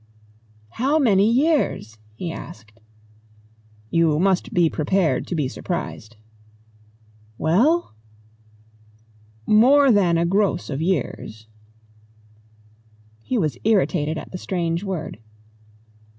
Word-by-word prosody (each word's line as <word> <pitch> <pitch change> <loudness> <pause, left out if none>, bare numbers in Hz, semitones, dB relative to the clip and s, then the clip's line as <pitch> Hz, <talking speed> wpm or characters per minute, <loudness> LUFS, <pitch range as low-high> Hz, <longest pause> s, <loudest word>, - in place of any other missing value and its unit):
"How 275 - 0
many 215 -7 +3
years?" 255 - 0 0.2
he 170 +8 -5
asked. 110 -8 -11 1.2
"You 165 -3 +2
must 185 +2 +1
be 175 -2 +3
prepared 160 -1 0
to 180 - -3
be 150 -5 0
surprised." 130 - -6 1.2
"Well?" 245 - +2 1.5
"More 265 +6 +5
than 185 -6 +3
a 170 - +1
gross 195 -1 0
of 135 - -3
years." 130 - -3 1.8
He 255 - -2
was 155 - -1
irritated 180 -7 +1
at - - -8
the 180 - -6
strange 170 -1 -2
word. 180 - -5
180 Hz, 95 wpm, -22 LUFS, 155-210 Hz, 1.8 s, More